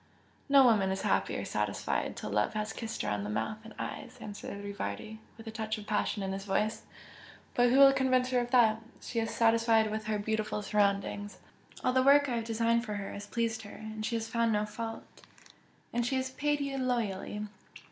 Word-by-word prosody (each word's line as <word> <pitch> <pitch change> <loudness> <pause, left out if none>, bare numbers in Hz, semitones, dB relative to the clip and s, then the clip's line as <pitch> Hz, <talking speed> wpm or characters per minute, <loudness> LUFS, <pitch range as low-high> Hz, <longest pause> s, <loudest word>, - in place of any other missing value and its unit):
"No 275 -1 +8
woman 210 -5 +4
is 190 0 -2
happy - - +1
or - - -4
satisfied - - -1
till - - -5
love - - +1
has 215 0 -2
kissed 225 -1 -4
her 105 - -1
on 105 -1 -1
the 105 - -4
mouth 110 - -2
and 220 -1 -12
eyes!" - - -6
answered 205 -1 -7
Rivardi, 205 +2 -5 0.2
with 225 - -11
a 220 - -5
touch 220 0 -3
of 210 - -9
passion 210 -1 0
in 190 - -2
his 195 0 -4
voice, 210 +2 0 0.7
"But 245 0 +4
who 255 - +4
will 275 0 +9
convince 255 -1 +2
her 250 - +3
of 240 0 -2
that? 225 -3 +4 0.2
She 230 - -3
is 225 0 -1
satisfied 225 -1 +3
with 215 0 -3
her 215 -1 0
beautiful 215 0 -2
surroundings, 205 0 0 0.5
all 255 - +2
the 260 - +4
work 285 +2 +6
I 245 -3 -1
have 230 - -3
designed 230 +1 +1
for 210 -3 -4
her 200 -1 -5
has 205 0 -7
pleased 230 0 -1
her, 220 +1 -10 0.2
she 220 +2 -1
has 225 -1 -2
found 230 0 +1
no 210 0 +1
fault 225 +2 -5 0.5
" - - -34
"And 240 0 +1
she 245 +3 0
has 260 0 -1
paid 295 +2 0
you 275 -1 -2
loyally!" 210 -5 -1
225 Hz, 210 wpm, -31 LUFS, 210-240 Hz, 0.7 s, will